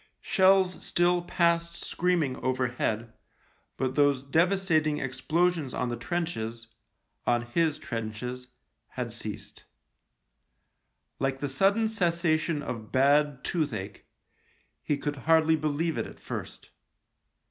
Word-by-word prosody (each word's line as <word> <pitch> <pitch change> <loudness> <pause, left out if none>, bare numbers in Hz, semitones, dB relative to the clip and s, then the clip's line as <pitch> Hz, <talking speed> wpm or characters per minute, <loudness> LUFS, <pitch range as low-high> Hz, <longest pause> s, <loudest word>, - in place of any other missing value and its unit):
Shells 190 -1 +3
still 175 0 +2
passed 170 -1 0
screaming 170 -7 +1
over 130 -1 0
head, 115 -2 -2 0.6
but 130 -1 -1
those 145 -2 +3
devastating 160 0 +2
explosions 155 +3 0
on 125 - -1
the 120 - -2
trenches 120 -6 -3 0.3
— - - -42
on 120 -1 +2
his 155 +6 0
trenches 120 +2 -5 0.2
— - - -51
had - - -3
ceased. - - -7 1.6
Like 135 0 -1
the 145 - -2
sudden 195 +11 +2
cessation 170 -6 +1
of 110 -3 -6
bad 140 +1 +3
toothache, 110 - -3 0.7
he 150 - 0
could 145 0 -2
hardfy 160 -1 +4
believe 155 +2 0
it - - -2
at - - -13
first. - - -7
150 Hz, 115 wpm, -28 LUFS, 125-170 Hz, 1.6 s, hardfy